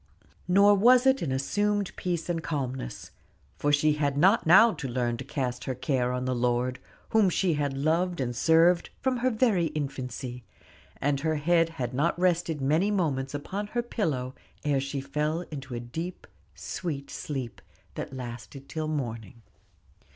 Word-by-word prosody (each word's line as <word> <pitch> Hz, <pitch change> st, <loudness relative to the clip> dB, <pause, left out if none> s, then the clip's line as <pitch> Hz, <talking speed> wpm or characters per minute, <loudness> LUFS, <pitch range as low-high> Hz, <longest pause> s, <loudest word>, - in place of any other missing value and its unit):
Nor 200 Hz, +3 st, +6 dB
was 245 Hz, +5 st, +5 dB
it 265 Hz, 0 st, +4 dB
an 145 Hz, -, -2 dB
assumed 205 Hz, +9 st, 0 dB
peace 175 Hz, -2 st, -2 dB
and 170 Hz, -2 st, -1 dB
calmness; 135 Hz, -, -4 dB, 0.5 s
for 145 Hz, -, +1 dB
she 150 Hz, +1 st, +4 dB
had 145 Hz, -2 st, 0 dB
not 190 Hz, +5 st, +4 dB
now 210 Hz, +7 st, +7 dB
to 135 Hz, -, -5 dB
learn 120 Hz, -1 st, -1 dB
to 135 Hz, -, -6 dB
cast 125 Hz, -2 st, -3 dB
her 130 Hz, -, -2 dB
care 130 Hz, -1 st, 0 dB
on 125 Hz, 0 st, -2 dB
the 130 Hz, -, 0 dB
Lord, 125 Hz, +1 st, 0 dB, 0.3 s
whom 215 Hz, -4 st, +4 dB
she 180 Hz, 0 st, +1 dB
had 145 Hz, -2 st, -1 dB
loved 170 Hz, +4 st, +1 dB
and 120 Hz, -2 st, -2 dB
served 165 Hz, +5 st, +4 dB
from 260 Hz, -1 st, 0 dB
her 250 Hz, +2 st, +1 dB
very 220 Hz, -7 st, +2 dB
infancy; 130 Hz, -3 st, -4 dB, 0.6 s
and 140 Hz, 0 st, +1 dB
her 160 Hz, +2 st, 0 dB
head 165 Hz, +2 st, +2 dB
had 125 Hz, -1 st, -3 dB
not 150 Hz, +7 st, +1 dB
rested 175 Hz, -4 st, +1 dB
many 155 Hz, +9 st, +2 dB
moments 145 Hz, -9 st, -1 dB
upon 195 Hz, +8 st, -4 dB
her 240 Hz, +3 st, -2 dB
pillow 145 Hz, -, -2 dB, 0.3 s
ere 145 Hz, -2 st, +2 dB
she 135 Hz, +1 st, -3 dB
fell 150 Hz, +4 st, -1 dB
into 135 Hz, -4 st, -6 dB
a -, -, -3 dB
deep, 160 Hz, +10 st, -6 dB, 0.3 s
sweet 145 Hz, -6 st, -5 dB
sleep, 130 Hz, -6 st, -5 dB, 0.3 s
that -, -, -5 dB
lasted 125 Hz, +1 st, -8 dB
until 155 Hz, +2 st, -4 dB
morning. 115 Hz, -7 st, -4 dB
145 Hz, 165 wpm, -27 LUFS, 130-175 Hz, 0.6 s, now